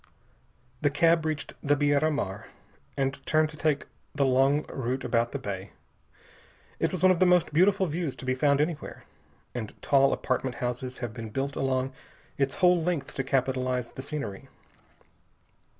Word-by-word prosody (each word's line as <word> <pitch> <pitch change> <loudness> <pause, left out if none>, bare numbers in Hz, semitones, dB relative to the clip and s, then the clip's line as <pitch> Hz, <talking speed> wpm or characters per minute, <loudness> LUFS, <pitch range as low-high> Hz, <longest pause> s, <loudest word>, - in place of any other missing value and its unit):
The 145 - +3
cab 165 +2 +3
reached 155 -1 -3
the 145 0 +3
Beira 145 +1 +2
Mar, 105 -10 -3 0.5
and 135 0 -1
turned 155 0 +3
to 155 - -10
take 150 -2 0 0.3
the 140 -1 +2
long 135 +3 +3
route 130 0 -3
about 115 0 +1
the - - -2
bay. 100 -7 -6 1.1
It - - +1
is 185 -2 -4
one 185 - +7
of 180 - +1
the 185 - +5
most 180 -4 +3
beautiful 190 +4 +4
views 160 -3 -2
to - - -9
be 130 - +1
found 140 +2 +2
anywhere, 155 0 -3 0.5
and 115 -4 -6
tall 135 -1 +4
apartment 130 -1 -1
houses 125 +1 -3
have 115 - -7
been 115 -1 -6
built 135 +5 -3
along 130 0 0 0.4
its 135 -1 0
whole 180 -1 +4
length 165 -4 -2
to 135 - -2
capitalize 130 -2 0
the - - -7
scenery. 135 -9 -5
140 Hz, 165 wpm, -28 LUFS, 130-155 Hz, 1.1 s, one